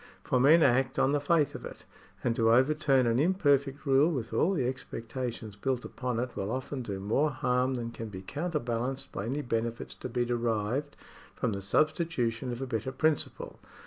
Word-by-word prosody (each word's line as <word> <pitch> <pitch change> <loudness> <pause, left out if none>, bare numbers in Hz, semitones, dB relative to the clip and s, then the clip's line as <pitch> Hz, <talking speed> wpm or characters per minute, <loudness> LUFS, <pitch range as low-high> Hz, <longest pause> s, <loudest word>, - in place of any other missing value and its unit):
For 130 - +1
men 155 +6 +6
act 130 0 +3
on 135 - +3
the 145 - +2
faith 150 0 +2
of - - -8
it; - - -9 0.4
and 115 - +1
to 115 -1 +3
overturn 135 +1 +4
an 115 +1 +2
imperfect 145 -4 +2
rule 140 +3 +4
with 120 -7 -4
all 190 - +3
the 140 -9 0
expectations 120 -3 -5
built 125 +4 -2
upon 125 -2 -3
it 125 0 -3
will 100 - -3
often 130 +2 -3
do 100 -5 -4
more 115 +10 +1
harm 125 -1 0
than 115 -1 -4
can 115 -1 -6
be 95 -2 -8
counterbalanced 135 - -3
by 100 - -4
any 145 +4 -2
benefits 115 0 -2
to 130 - -7
be 120 0 0
derived 120 +3 -1 0.4
from 110 - -1
the 100 - -4
substitution 130 - 0
of 120 +2 -4
a - - -2
better 125 0 -3
principle. 155 +3 -1
130 Hz, 185 wpm, -30 LUFS, 115-140 Hz, 0.4 s, men